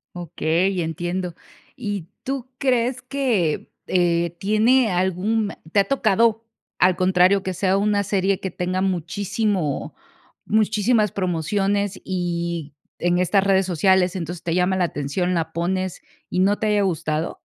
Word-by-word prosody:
Okey, 175 Hz, +2 st, 0 dB
entiendo. 175 Hz, +2 st, -3 dB, 0.4 s
¿Y 205 Hz, -8 st, -4 dB, 0.2 s
tú 265 Hz, -1 st, -4 dB
crees 255 Hz, -1 st, +1 dB
que 245 Hz, -, -1 dB, 0.2 s
eh, 170 Hz, -1 st, +1 dB
tiene 220 Hz, +4 st, +3 dB
algún 190 Hz, +4 st, 0 dB, 0.2 s
te 200 Hz, -, +4 dB
ha -, -, +2 dB
tocado, 230 Hz, -3 st, +2 dB, 0.3 s
al 185 Hz, 0 st, +4 dB
contrario, 185 Hz, +1 st, +3 dB
que 190 Hz, -, -3 dB
sea 190 Hz, +2 st, +1 dB
una 205 Hz, 0 st, +1 dB
serie 195 Hz, -1 st, 0 dB
que 190 Hz, -, -3 dB
tenga 185 Hz, +2 st, -2 dB
muchísimo 190 Hz, -2 st, -1 dB, 0.5 s
muchísimas 215 Hz, 0 st, +2 dB
promociones, 195 Hz, +3 st, -1 dB
y 170 Hz, -4 st, -3 dB, 0.2 s
en 175 Hz, +1 st, +1 dB
estas 190 Hz, +2 st, +3 dB
redes 190 Hz, -1 st, +2 dB
sociales. 185 Hz, +1 st, +2 dB
Entonces, 175 Hz, -1 st, -5 dB
te 170 Hz, 0 st, -1 dB
llama 180 Hz, +1 st, +2 dB
la 180 Hz, -, +2 dB
atención, 170 Hz, +4 st, -2 dB
la 160 Hz, -1 st, -2 dB
pones, 185 Hz, +2 st, -2 dB, 0.3 s
y 180 Hz, -, -1 dB
no 200 Hz, +2 st, +3 dB
te 215 Hz, -, -1 dB
haya 210 Hz, -1 st, +2 dB
gustado? 160 Hz, -4 st, -2 dB
190 Hz, 135 wpm, -22 LUFS, 175-205 Hz, 0.5 s, te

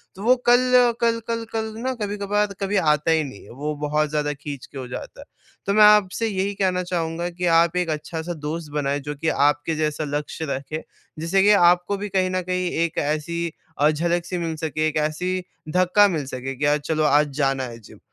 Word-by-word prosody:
तो 195 Hz, -, -9 dB
वो 250 Hz, +2 st, +5 dB
कल, 245 Hz, -1 st, +5 dB
कल 230 Hz, -1 st, +2 dB
कल 230 Hz, 0 st, -2 dB
कल 220 Hz, -1 st, -2 dB
ना 260 Hz, +1 st, -1 dB
कभी-कभार 205 Hz, 0 st, -1 dB
कभी 195 Hz, +1 st, 0 dB
आता 150 Hz, -2 st, +2 dB
ही 160 Hz, -1 st, +3 dB
नहीं 130 Hz, -8 st, -9 dB
है, -, -, -16 dB
वो 150 Hz, +5 st, -4 dB
बहुत 150 Hz, 0 st, 0 dB
ज़्यादा 150 Hz, -1 st, -1 dB
खींच 140 Hz, -2 st, -8 dB
के -, -, -12 dB
हो 130 Hz, -2 st, -5 dB
जाता 125 Hz, -, -8 dB
है। -, -, -12 dB, 0.4 s
तो 200 Hz, -, +1 dB
मैं 215 Hz, 0 st, +6 dB
आपसे 210 Hz, +1 st, +4 dB
यही 200 Hz, -1 st, -1 dB
कहना 185 Hz, -2 st, 0 dB
चाहूँगा 170 Hz, -1 st, -2 dB
कि 175 Hz, +1 st, -4 dB
आप 170 Hz, +1 st, +2 dB
एक 180 Hz, -2 st, 0 dB
अच्छा-सा 160 Hz, +2 st, -4 dB
दोस्त 160 Hz, -1 st, -5 dB
बनाएँ 145 Hz, -1 st, 0 dB
जो 150 Hz, -, -3 dB
कि 160 Hz, +3 st, -1 dB, 0.2 s
आपके 150 Hz, +2 st, -2 dB
जैसा 155 Hz, 0 st, -1 dB
लक्ष्य 150 Hz, +2 st, -5 dB
रखे, 140 Hz, +4 st, -4 dB, 0.4 s
जिससे 170 Hz, +4 st, +2 dB
कि 205 Hz, -, +6 dB, 0.2 s
आपको 180 Hz, +3 st, +1 dB
भी 205 Hz, +1 st, -5 dB
कहीं 185 Hz, -1 st, +1 dB
न 185 Hz, -, 0 dB
कहीं 180 Hz, 0 st, -2 dB
एक 165 Hz, -, -6 dB
ऐसी 155 Hz, +3 st, -1 dB, 0.4 s
अ, 150 Hz, -, +6 dB
झलक-सी 170 Hz, +3 st, -1 dB
मिल 165 Hz, -2 st, -2 dB
सके, 155 Hz, 0 st, -1 dB
एक 155 Hz, 0 st, -2 dB
ऐसी 170 Hz, +5 st, -1 dB, 0.3 s
धक्का 185 Hz, +3 st, +5 dB
मिल 160 Hz, -7 st, -2 dB
सके 130 Hz, 0 st, -5 dB
कि 145 Hz, -, -2 dB
यार 145 Hz, +1 st, +3 dB
चलो 155 Hz, -1 st, 0 dB
आज 150 Hz, 0 st, +4 dB
जाना 135 Hz, -2 st, +1 dB
है 120 Hz, -2 st, -7 dB
जिम, 110 Hz, -, -16 dB
165 Hz, 210 wpm, -23 LUFS, 150-195 Hz, 0.4 s, मैं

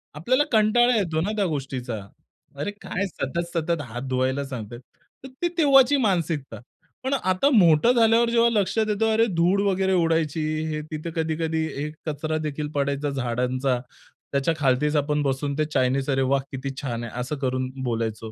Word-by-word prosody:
आपल्याला 255 Hz, -, +2 dB
कंटाळा 235 Hz, +3 st, +4 dB
येतो 165 Hz, -7 st, 0 dB
ना 205 Hz, +5 st, -1 dB
त्या 205 Hz, -2 st, +1 dB
गोष्टीचा. 135 Hz, -7 st, -3 dB, 0.6 s
अरे 145 Hz, +9 st, -3 dB
काय 200 Hz, -, -2 dB
सतत-सतत 170 Hz, 0 st, -2 dB
हात 120 Hz, -1 st, -7 dB
धुवायला 130 Hz, +2 st, 0 dB
सांगतायेत! 120 Hz, -2 st, -7 dB, 0.4 s
तर -, -, -7 dB
ती 350 Hz, -, +2 dB
तेव्हाची 280 Hz, -3 st, +5 dB
मानसिकता. 170 Hz, -, -1 dB, 0.4 s
पण 265 Hz, -, -1 dB
आता 185 Hz, 0 st, +2 dB
मोठं 175 Hz, +1 st, +5 dB
झाल्यावर 230 Hz, 0 st, +4 dB
जेव्हा 235 Hz, 0 st, +4 dB
लक्षात 215 Hz, 0 st, +1 dB
येतं, 220 Hz, +2 st, +1 dB
अरे 225 Hz, +1 st, +4 dB
धूळ 180 Hz, +4 st, +3 dB
वगैरे 190 Hz, 0 st, +1 dB
उडायची, 165 Hz, -3 st, +1 dB, 0.3 s
हे 155 Hz, -1 st, -3 dB
तिथे 155 Hz, +2 st, -5 dB
कधी-कधी 160 Hz, 0 st, -1 dB
हे 145 Hz, +2 st, -3 dB, 0.2 s
कचरा 155 Hz, +1 st, -2 dB
देखील 150 Hz, -1 st, -3 dB
पडायचा 140 Hz, +1 st, 0 dB
झाडांचा, 125 Hz, 0 st, -1 dB, 0.5 s
त्याच्या 140 Hz, +4 st, +1 dB
खालीच 150 Hz, +1 st, +1 dB
आपण 150 Hz, +1 st, +1 dB
बसून 140 Hz, +1 st, -1 dB
ते 155 Hz, -, +1 dB
चायनीज, 135 Hz, +2 st, +1 dB
अरे 135 Hz, -1 st, +2 dB
वाह! 135 Hz, +1 st, +2 dB
किती 135 Hz, 0 st, -4 dB
छान 120 Hz, -4 st, -3 dB
आहे, 120 Hz, +1 st, -6 dB
असं 130 Hz, +5 st, -3 dB
करून 130 Hz, -1 st, -1 dB
बोलायचो. 115 Hz, -2 st, -3 dB
155 Hz, 160 wpm, -24 LUFS, 135-195 Hz, 0.6 s, तेव्हाची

